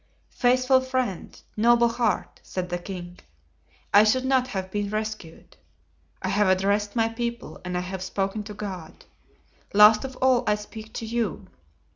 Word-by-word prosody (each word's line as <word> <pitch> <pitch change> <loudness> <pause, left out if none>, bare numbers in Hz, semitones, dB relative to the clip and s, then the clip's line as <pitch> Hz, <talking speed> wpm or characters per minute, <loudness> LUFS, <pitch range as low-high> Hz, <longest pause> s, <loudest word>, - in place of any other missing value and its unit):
"Faithful 255 +1 +3
friend, 255 -7 -3
noble 235 +2 +4
heart!" 235 0 -1
said 180 -1 -4
the 175 0 -2
king, 175 -1 -8 0.7
"I 205 +1 +8
should 255 +5 +2
not 260 -1 +2
have 190 -5 -5
been 205 0 -2
rescued. 215 -6 -6 0.7
I 190 - -1
have 205 +1 +2
addressed 200 +3 +1
my 225 -1 +3
people 235 +1 -5
and 180 -1 -3
I - - -1
have 185 +1 -6
spoken 195 +2 -2
to 210 -1 -8
God; 185 -6 -8 0.7
last 210 +1 +7
of 265 -1 -6
all 255 -1 +3
I 210 - +4
speak 215 +1 -10
to 225 - -5
you. 230 0 -3
210 Hz, 155 wpm, -25 LUFS, 190-240 Hz, 0.7 s, I